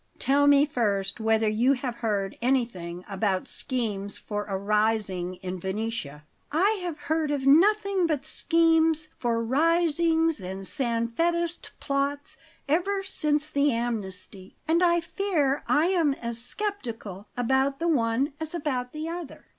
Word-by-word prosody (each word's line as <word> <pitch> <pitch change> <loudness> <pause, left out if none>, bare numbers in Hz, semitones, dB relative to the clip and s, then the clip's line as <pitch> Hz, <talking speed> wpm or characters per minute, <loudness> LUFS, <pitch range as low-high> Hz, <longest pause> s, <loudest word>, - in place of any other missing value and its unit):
"Tell 285 +1 +3
me 285 0 +6
first 205 -7 -1
whether 220 0 +2
you 230 +6 +3
have 250 -2 -4
heard 205 -4 -1
anything 210 -9 -1
about 195 -2 -1
schemes 210 -6 -3
for 205 -1 -4
a 195 -2 -2
rising 200 -3 0
in 185 0 -4
Venetia." 190 -6 -4 0.3
"I 390 +8 +2
have 345 -4 -4
heard 315 0 0
of 285 -2 -1
nothing 390 +4 +4
but 300 -3 -1
schemes 325 -1 +2
for 230 -1 0
risings 325 - +2
and 190 +1 -6
Sanfedist 290 - -1
plots 280 +1 -2 0.3
ever 390 +6 +1
since 300 -5 0
the 285 -1 +3
amnesty, 205 -5 -3
and 330 +2 +3
I 345 -1 +4
fear 325 -7 0
I 315 +4 +3
am 330 -7 +2
as 235 -2 -4
sceptical 235 - -5
about 265 +3 +1
the 335 - -1
one 265 -1 +1
as 315 +1 -4
about 260 -6 -2
the 310 +1 -4
other." 335 -3 -7
270 Hz, 140 wpm, -26 LUFS, 220-320 Hz, 0.3 s, me